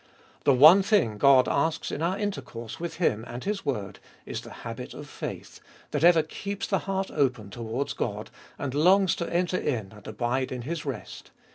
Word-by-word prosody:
The 140 - +6
one 155 +9 +9
thing 185 - +2
God 135 -1 +6
asks 155 +3 0
in 145 - -4
our 175 +4 0
intercourse 120 - -5
with 170 0 -4
Him 110 - +1
and 120 +2 -7
His 205 -1 -2
word 105 -7 -3 0.3
is - - -5
the - - -11 0.2
habit 65 - -6
of - - -9
faith, - - -7 0.3
that - - -1
ever 170 -2 +6
keeps 200 +5 -5
the 195 - 0
heart 195 0 -1
open 125 -8 0
towards 120 +4 -3
God, 105 -1 -4 0.3
and 140 -3 -4
longs 185 +6 +4
to 170 - -4
enter 180 +1 +1
in 110 - -2
and 105 -2 -14
abide 120 +4 -1
in 125 -2 -4
His 155 +3 -4
rest. 130 -6 -6
140 Hz, 185 wpm, -27 LUFS, 120-175 Hz, 0.3 s, one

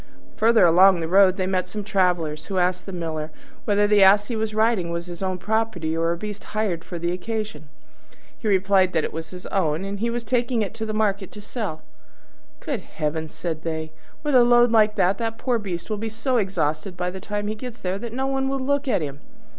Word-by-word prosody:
Further 225 -1 +5
along 180 +2 +6
the 165 - -2
road 190 +1 +5
they 185 - 0
met 185 -1 -1
some 210 -1 -5
travellers, 175 -6 0
who 195 - -4
asked 180 +1 0
the - - -5
Miller 160 -3 -4 0.4
whether 205 -1 +3
the 205 -1 +4
Ass 200 +3 +6
he 235 - -2
was 220 0 -1
riding 215 -5 +2
was 170 0 -3
his 175 0 -8
own 185 -1 -1
property, 190 -5 -1
or 165 +1 +1
a 170 - -2
beast 210 +2 -6
hired 210 -6 -2
for 175 - -7
the 170 +1 -1
occasion. 185 -5 -4 0.7
He 220 - -6
replied 190 -1 +3
that 160 - +1
it - - -3
was 160 0 -5
his 180 +1 -10
own, 165 -2 0
and 200 0 -4
that - - -9
he 235 - +1
was 235 0 -3
taking 240 0 0
it 205 - -5
to 220 -1 -4
market 205 -3 0
to 210 - -9
sell. 205 -6 -5 0.8
"Good - - -3
heavens!" 155 0 -4
said 160 -3 -4
they, 160 -1 -4 0.3
"with 295 -1 0
a 250 -2 +7
load 240 0 +5
like 215 -2 +4
that 190 +2 +2
the 225 -1 -2
poor 245 -2 0
beast 185 -5 -5
will 215 - -2
be 220 +2 -3
so 235 +4 -1
exhausted 180 -4 -1
by 180 0 -2
the 190 - -7
time 205 +2 -4
he 210 - -1
gets 240 +2 -8
there 185 +1 -2
that 235 +1 -6
no 260 +3 -2
one 270 0 0
will 275 0 -1
look 285 +2 0
at 210 -10 +1
him. 140 -1 -6
195 Hz, 230 wpm, -23 LUFS, 175-220 Hz, 0.8 s, a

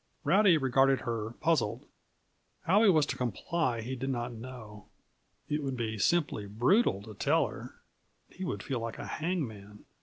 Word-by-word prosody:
Rowdy 195 -4 +5
regarded 135 -1 +3
her, 115 -2 -3
puzzled. 155 -10 +1 0.8
How 195 +5 +4
he 225 - +6
was 155 -5 +4
to - - -3
comply 125 - -1
he 125 +4 -4
did 135 +2 -4
not 120 -2 -2
know. 110 -3 -10 0.6
It 150 +1 -1
would 135 -2 -3
be 110 -2 -3
simply 140 - +1
brutal 115 - +2
to 110 0 -10
tell 145 +8 +2
her. 120 +3 -10 0.5
He 190 - -9
would 100 - -3
feel 130 -3 -2
like 115 -1 -5
a - - -6
hangman. 110 - -4
125 Hz, 160 wpm, -30 LUFS, 110-155 Hz, 0.8 s, he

